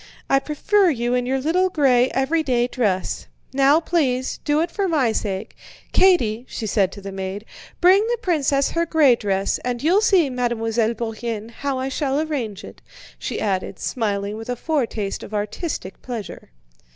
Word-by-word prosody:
I 275 - +5
prefer 355 +7 +2
you 240 -4 0
in 250 0 0
your 265 +1 0
little 355 +7 +2
gray 260 -6 +3
everyday 265 -3 +1
dress. 210 -7 -1 0.3
Now 275 +3 +5
please, 270 -7 0
do 295 0 +2
it 335 +1 0
for 395 +1 -1
my 285 -9 +2
sake. 205 0 -3 0.4
Katie," 245 - +3
she 225 - -5
said 195 -2 +1
to 200 - -10
the 195 0 -7
maid, 190 +2 -5 0.4
"bring 370 +3 +6
the 480 0 0
princess 290 - +1
her 335 0 0
gray 300 -7 +5
dress, 195 -3 -1
and 245 0 -3
you'll 365 +7 +4
see, 380 -8 +4
Mademoiselle 235 -2 0
Bourienne, 225 -1 -4
how 275 +3 -3
I 260 +1 -2
shall 275 0 -1
arrange 270 -11 -3
it," - - -12 0.4
she - - -4
added, 190 -3 -2
smiling 205 -3 -2
with 225 +2 -8
a 245 - 0
foretaste 235 -8 -2
of 215 - -7
artistic 205 - -4
pleasure. 235 -6 -7
250 Hz, 165 wpm, -22 LUFS, 220-310 Hz, 0.4 s, bring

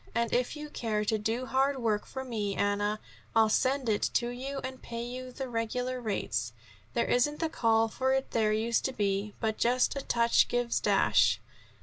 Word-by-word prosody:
And 235 0 0
if 250 +4 +1
you 300 0 -7
care 215 -2 -1
to 215 +1 +1
do 225 +4 -1
hand 270 +2 +1
work 220 -4 0
for 265 - -5
me, 215 -6 -2
Anna, 205 +1 0 0.4
I'll 220 -1 +5
send 260 +3 +1
it 210 -2 +1
to 240 - +2
you, 265 +3 -5
and 260 0 -6
pay 235 0 -5
you 255 +1 -6
the 265 +1 -5
regular 250 +2 -2
rates. 115 - -2 0.4
There 235 - +2
isn't 295 +5 +1
the 325 - 0
call 225 -6 +3
for 260 +4 -1
it 265 0 -2
there 220 -2 +2
used 225 +2 +1
to 265 - -1
be, 205 -2 -1
but 220 -1 -1
just 250 +3 +2
a 275 - -2
touch 235 -3 +3
gives 245 -1 0
dash." 115 - +3
235 Hz, 195 wpm, -30 LUFS, 215-255 Hz, 0.4 s, I'll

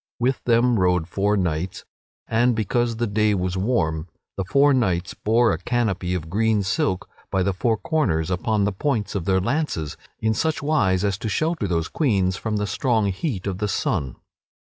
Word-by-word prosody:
With 125 +2 0
them 120 -1 +3
rode 90 -3 +2
four 100 +3 +1
knights, 90 -1 -2 0.4
and, 120 +1 +2
because 115 +2 0
the 120 +1 -1
day 105 0 +2
was 90 -1 -1
warm, 90 -6 0 0.3
the 95 - -2
four 140 +8 +4
knights 95 -8 0
bore 115 +1 +2
a 80 - -1
canopy 95 -5 -1
of 80 -3 -4
green 110 +3 +1
silk 95 -1 -1 0.2
by 95 -1 +1
the 100 +1 +1
four 110 +4 +1
corners 95 - 0
upon 100 +4 0
the 100 - +1
points 110 -2 -1
of 95 -5 -3
their 95 -1 +3
lances 95 - -2 0.2
in 110 0 +1
such 160 +5 -1
wise 105 -12 +2
as 100 -1 0
to 110 - -3
shelter 155 -1 0
those 85 -2 0
queens 100 - +1
from 110 +1 -3
the 105 - 0
strong 110 -3 +1
heat 100 - -3
of 95 -2 -3
the 105 - 0
sun. 70 -9 -1
100 Hz, 185 wpm, -23 LUFS, 90-120 Hz, 0.4 s, four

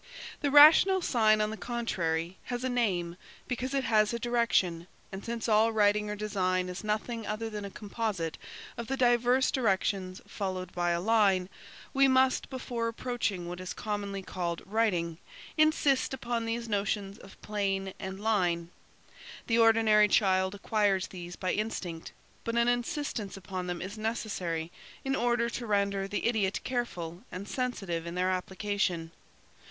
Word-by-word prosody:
"The 285 - 0
rational 315 +6 +8
sign, 215 -6 +3
on 210 0 0
the 220 - -6
contrary, 180 -9 -2
has 245 0 -4
a 260 - 0
name 180 -8 0 0.3
because 255 +2 -2
it 270 - +1
has 215 -3 +3
a 235 - -1
direction 225 -8 +1 0.2
and 195 0 -7
since 235 -1 -3
all 220 +1 +4
writing 210 -1 +2
or 210 - -2
design 185 -3 -1
is 180 +3 -6
nothing 215 +1 -2
other 220 +1 -3
than 210 -1 -5
a - - -5
composite 200 -5 -3 0.4
of 235 -1 -5
the 270 - -2
diverse 245 +1 +3
directions 195 -5 0
followed 185 -3 -4
by 175 -1 0
a 170 0 +1
line, 195 -2 +3 0.4
we 275 0 +5
must, 260 0 +3
before 245 -3 -3
approaching 230 -6 -2
what 175 +1 -6
is 185 0 -5
commonly 200 -2 -4
called 175 -2 -3
writing, 180 -6 0 0.4
insist 305 -4 +3
upon 240 -2 -2
these 230 +1 -3
notions 200 -1 -2
of 195 - -14
plane 195 -2 -1
and 190 0 -6
line. 175 -6 0 0.7
The 230 0 +2
ordinary 225 -2 +5
child 190 -1 +2
acquires 200 -2 +1
these 175 -1 -8
by 185 - -2
instinct, 185 -6 -4 0.3
but 230 - -2
an 235 0 +3
insistence 245 - -2
upon 185 -1 -5
them 175 -1 -3
is 200 +4 -7
necessary 185 -7 -2 0.3
in 270 0 +1
order 240 -1 +1
to 240 -1 -5
render 200 -1 +1
the 205 - -3
idiot 215 -5 +1
careful 180 -9 -3
and 190 +3 -6
sensitive 195 -11 -3
in 170 - -5
their 185 +1 +1
application. 185 -3 -2
210 Hz, 155 wpm, -30 LUFS, 185-235 Hz, 0.7 s, rational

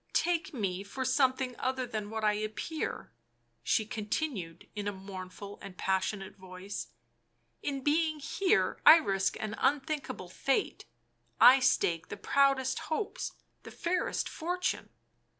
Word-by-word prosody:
Take 340 -1 +1
me 195 - -2
for 255 +6 -4
something 260 -1 +2
other 260 0 -1
than 215 -3 -4
what 220 0 -4
I 210 -1 +4
appear," 215 +9 -4 0.5
she 220 - +1
continued, 210 - -3
in 205 -1 -4
a - - +1
mourn 190 -1 -8
ful 200 +2 -10
and 195 -2 -9
passionate 190 +1 -1
voice. 185 +1 -7 0.4
" 120 0 -45
In 275 -1 -2
being 310 +2 +2
here 370 +6 +1
I - - +11
risk 195 -12 +1
an 215 -1 -3
unthinkable 275 - -1
fate 275 - -1 0.3
— - - -41
I 270 - +3
stake 170 -10 +2
the - - -6
proudest 265 +3 +2
hopes... 385 +6 -2 0.3
the - - -10
fairest 355 +1 -1
fortune. 360 +3 -2
..." - - -42
225 Hz, 145 wpm, -31 LUFS, 195-280 Hz, 0.5 s, I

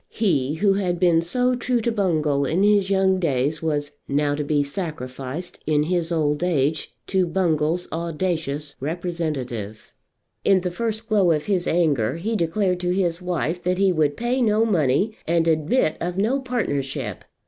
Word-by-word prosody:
He 150 - 0
who 195 +4 +3
had 180 -3 -1
been 170 -3 +4
so 250 +9 +1
true 245 0 0
to 235 - 0
Bungall 155 -9 +1
in 170 +7 +1
his 205 -2 +3
young 190 -1 +3
days 150 -2 0
was 145 -2 -1 0.2
now 145 +1 +1
to 150 +1 -2
be 145 0 +1
sacrificed 140 0 -5
in 150 -1 +3
his 170 +1 -1
old 150 -2 +1
age 155 -3 0
to 190 -2 +1
Bungall's 165 -1 0
audacious 160 -3 -2
representative! 145 - -4 0.5
In 195 -2 +4
the 180 0 -2
first 220 +3 -3
glow 205 -5 +3
of 150 -2 +1
his 190 -4 0
anger 150 -10 +1
he 210 +7 -2
declared 180 +1 0
to 180 0 -1
his 180 -2 0
wife 175 -1 -2
that 180 +1 0
he 195 0 +3
would 155 -4 +1
pay 245 +2 0
no 220 -1 +3
money 190 - +1
and 165 0 +2
admit 160 - +2
of 175 +1 -3
no 225 +8 +1
partnership. 140 - -3
170 Hz, 165 wpm, -23 LUFS, 150-195 Hz, 0.5 s, been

